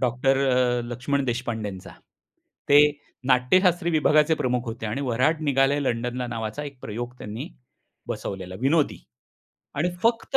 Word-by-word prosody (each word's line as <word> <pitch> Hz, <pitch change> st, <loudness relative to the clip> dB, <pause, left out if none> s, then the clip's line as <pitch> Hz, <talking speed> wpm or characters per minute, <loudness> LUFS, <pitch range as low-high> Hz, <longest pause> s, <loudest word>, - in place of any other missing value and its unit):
Doctor 130 Hz, +2 st, +2 dB
अ, 125 Hz, -1 st, +2 dB
लक्ष्मण 135 Hz, +3 st, -1 dB
देशपांडेंचा. 115 Hz, -6 st, -4 dB, 0.8 s
ते 145 Hz, +1 st, +8 dB, 0.5 s
नाट्यशास्त्री 170 Hz, +7 st, +3 dB
विभागाचे 155 Hz, 0 st, +4 dB
प्रमुख 125 Hz, -3 st, -1 dB
होते 115 Hz, -1 st, -5 dB
आणि 120 Hz, +6 st, -3 dB
वऱ्हाड 135 Hz, +5 st, +1 dB
निघालंय 140 Hz, 0 st, +2 dB
लंडनला 125 Hz, 0 st, -2 dB
नावाचा 115 Hz, +3 st, -4 dB
एक 140 Hz, -2 st, -9 dB
प्रयोग 120 Hz, +3 st, -5 dB
त्यांनी 105 Hz, +2 st, -6 dB, 0.6 s
बसवलेला 95 Hz, -1 st, -5 dB
विनोदी. 145 Hz, +3 st, +2 dB, 0.8 s
आणि 155 Hz, +5 st, +1 dB
फक्त 230 Hz, +3 st, +2 dB
125 Hz, 120 wpm, -25 LUFS, 120-145 Hz, 0.8 s, ते